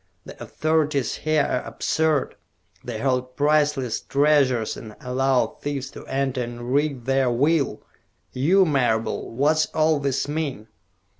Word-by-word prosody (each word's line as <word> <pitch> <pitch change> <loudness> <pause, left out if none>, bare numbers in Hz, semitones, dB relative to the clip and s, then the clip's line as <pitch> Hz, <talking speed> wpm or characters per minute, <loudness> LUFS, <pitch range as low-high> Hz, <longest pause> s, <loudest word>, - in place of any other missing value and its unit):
The - - -12
authorities 155 -5 0
here 155 -1 +1
are 125 - -1
absurd! 160 -3 0 0.5
They - - -5
hold 125 -1 -1
priceless 145 -5 +1
treasures 140 -5 +2
and 110 -2 -10
allow 130 +1 0
thieves 140 -2 -4
to - - -11
enter 135 -1 -1
and 120 +1 -5
wreak 140 -4 0
their 135 -1 +2
will. 140 +4 +1 0.5
You, 180 +9 +3
Marable, 125 -7 0
what's 150 +6 +2
all 155 -1 +3
this 140 -1 -1
mean?" 145 -8 -4
140 Hz, 130 wpm, -23 LUFS, 125-150 Hz, 0.5 s, You